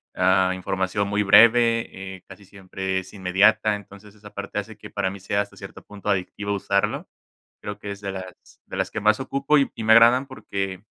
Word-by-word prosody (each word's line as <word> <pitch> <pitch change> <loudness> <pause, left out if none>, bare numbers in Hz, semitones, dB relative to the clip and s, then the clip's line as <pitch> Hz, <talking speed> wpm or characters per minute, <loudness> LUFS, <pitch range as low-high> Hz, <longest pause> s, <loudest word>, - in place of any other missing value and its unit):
ah, 95 0 +3
información 95 +2 -2
muy 105 +1 0
breve, 115 -3 +4
eh, 95 - -16
casi 95 +1 -14
siempre 95 -1 -5
es 95 - -12
inmediata. 100 +3 +3
Entonces, 100 0 -13
esa 105 -1 -15
parte - - -6
hace - - -8
que - - -11
para 95 - -2
mí 100 - -9
sea, 100 +2 -1
hasta 100 - -8
cierto - - -11
punto, 105 0 -8
adictivo 100 +1 -2
usarlo. 100 0 -1 0.6
Creo 105 - -6
que 100 - -7
es 100 - -10
de 100 -1 -4
las 95 -1 -11
de - - -8
las - - -1
que 110 - -4
más 110 +1 +3
ocupo, 140 +3 0
y 140 - +1
y 115 - -6
me 110 - +5
agradan, 120 +4 +6
porque 95 -7 -5
100 Hz, 200 wpm, -23 LUFS, 95-110 Hz, 0.6 s, agradan